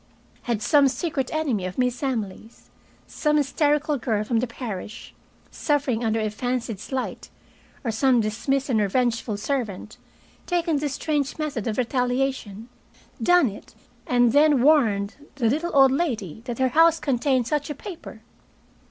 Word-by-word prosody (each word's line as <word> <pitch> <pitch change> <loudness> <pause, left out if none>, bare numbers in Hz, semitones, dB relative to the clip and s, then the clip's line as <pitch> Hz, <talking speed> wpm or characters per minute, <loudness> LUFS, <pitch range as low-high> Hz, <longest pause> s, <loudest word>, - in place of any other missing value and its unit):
Had 220 -3 0
some 290 -3 +5
secret 270 0 -2
enemy 280 -11 -1
of 185 - -8
Miss 250 -1 0
Emily's, 225 -5 -5 0.3
some 300 -1 0
hysterical 295 0 +1
girl 220 -3 0
from 225 +1 0
the 250 - -1
parish, 220 -3 -7 0.4
suffering 280 -6 0
under 225 0 +1
a 215 -1 -1
fancied 240 -1 -3
slight, 260 +4 -5 0.5
or 235 - -1
some 250 +2 +3
dismissed 240 +6 -1
and 230 -4 +2
revengeful 230 +1 0
servant, 215 -4 -4 0.5
taken 340 -3 +1
this 285 -1 -2
strange 295 -3 -1
method 295 -9 -3
of 215 - -2
retaliation, 250 -4 -1 0.5
done 355 -5 +5
it 205 -2 -9 0.3
and 245 -1 +3
then 290 -3 +5
warned 220 -10 +3 0.2
the 250 -5 +1
little 310 +9 0
old 270 -1 +7
lady 230 - -2
that 240 -3 -4
her 260 -1 +2
house 325 +4 +4
contained 260 -3 +1
such 295 +3 -2
a 295 - -4
paper? 325 - -9
255 Hz, 145 wpm, -24 LUFS, 225-290 Hz, 0.5 s, old